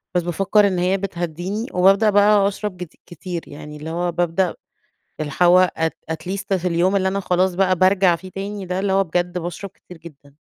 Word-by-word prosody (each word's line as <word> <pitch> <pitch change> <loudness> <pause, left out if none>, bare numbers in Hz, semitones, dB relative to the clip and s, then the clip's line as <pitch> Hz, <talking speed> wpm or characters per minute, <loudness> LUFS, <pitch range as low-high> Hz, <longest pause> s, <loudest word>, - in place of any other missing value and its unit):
بس 175 - +3
بافكَّر 195 +4 +2
إن 185 -2 -1
هي 185 +2 +1
بتهدّيني 180 +3 -4
وبابدأ 195 +4 +4
بقى 205 0 +4
أشرب 195 -3 -4
كتي 165 - -15
كتير 175 0 -6
يعني 150 +1 -10
اللي 155 +2 -7
هو 175 +1 -2
بابدأ 175 +1 0 0.6
اللي 150 -2 -4
هو 180 +1 +5
ات 160 0 -1
at - - +1
at 160 +4 -6
least 200 0 -3
في 180 +1 -3
اليوم 180 +3 +1
اللي 190 -1 +1
أنا 195 +1 -1
خلاص 180 -1 0
بقى 185 -1 +2
بارجع 185 -1 +3
فيه 185 +2 -11
تاني 195 +1 -6
ده 180 +1 -3
اللي 195 -1 0
هو 195 0 +3
بجد 175 +1 -2
باشرب 175 +3 -6
كتير 180 -2 -16
جدًا. 145 -4 -15
180 Hz, 205 wpm, -21 LUFS, 170-195 Hz, 0.6 s, هو